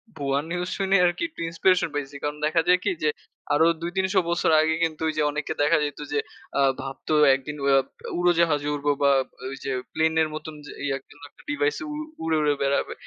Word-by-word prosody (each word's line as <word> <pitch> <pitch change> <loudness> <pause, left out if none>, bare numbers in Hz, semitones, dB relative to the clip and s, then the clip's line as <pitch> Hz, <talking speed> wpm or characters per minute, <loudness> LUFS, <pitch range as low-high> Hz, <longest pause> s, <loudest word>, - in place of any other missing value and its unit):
ভুয়া 140 -2 0
নিউজ 180 +1 -2
শুনে 195 0 +2
আরকি 175 - 0
একটু 320 - -10
ইন্সপিরেশন 180 +1 +2
পাইছি। 145 -1 -4
কারণ 150 0 -2
দেখা 165 +2 +2
যায় 180 0 +6
কি - - +1
যে, 155 - +4 0.4
আরো 150 +2 +4 0.2
২-৩০০ 190 +3 +1
বছর 170 -1 +1
আগে 160 0 +2
কিন্তু 160 -1 -2
এই - - -2
যে - - +2
অনেকে 150 +1 -3
দেখা 145 - +4
যাইত 145 -1 -4
যে 145 - +2 0.4
আ - - +4 0.2
ভাবতো 135 +3 -5 0.2
একদিন 135 +3 -6
উয়াব 135 -1 +4 0.3
উড়োজাহাজে 170 -4 +2
উড়বো 145 0 0
বা 140 - +5 0.4
ওই 135 - -6
যে 135 - -1 0.2
প্লেনের 160 0 +2
মতন 155 0 -6
যে - - -9
ইয়া 135 -1 0
কিংবা 145 0 -14
একটা - - -21
ডিভাইস 435 +10 +1 0.2
উড় 295 - -4 0.3
উড়ে, 160 -1 +1
উড়ে 150 -1 +3
বেড়াবে। 140 0 0
155 Hz, 195 wpm, -25 LUFS, 145-175 Hz, 0.4 s, যায়